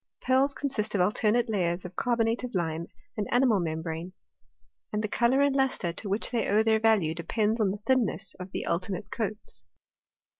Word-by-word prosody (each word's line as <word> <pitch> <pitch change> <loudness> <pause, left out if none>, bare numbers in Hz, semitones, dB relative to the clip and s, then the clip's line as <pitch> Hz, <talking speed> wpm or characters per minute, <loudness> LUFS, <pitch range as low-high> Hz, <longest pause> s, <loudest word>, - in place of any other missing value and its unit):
Pearls 265 +2 +3
consist 225 -7 -2
of 190 - +3
alternate 215 +5 +2
layers 180 -5 -1
of 180 0 -8
carbonate 230 +1 +1
of 250 -4 -5
lime 165 -1 -1 0.3
and 210 - -2
animal 245 -4 +4
membrane; 165 +1 -3 0.8
and 210 0 -1
the - - 0
colour 240 +5 +2
and 280 -1 +2
lustre 265 -10 +1
to 200 +3 -3
which 200 +3 0
they 235 -3 0
owe 215 +2 +4
their 220 0 +3
value 215 -8 +3
depends 210 +7 0
upon 210 -3 +3
the 195 - -2
thinness 230 -7 +1
of 185 +1 -7
thft - - -3
alternate 185 +3 -2
coats. 215 -2 -3
210 Hz, 180 wpm, -28 LUFS, 180-235 Hz, 0.8 s, animal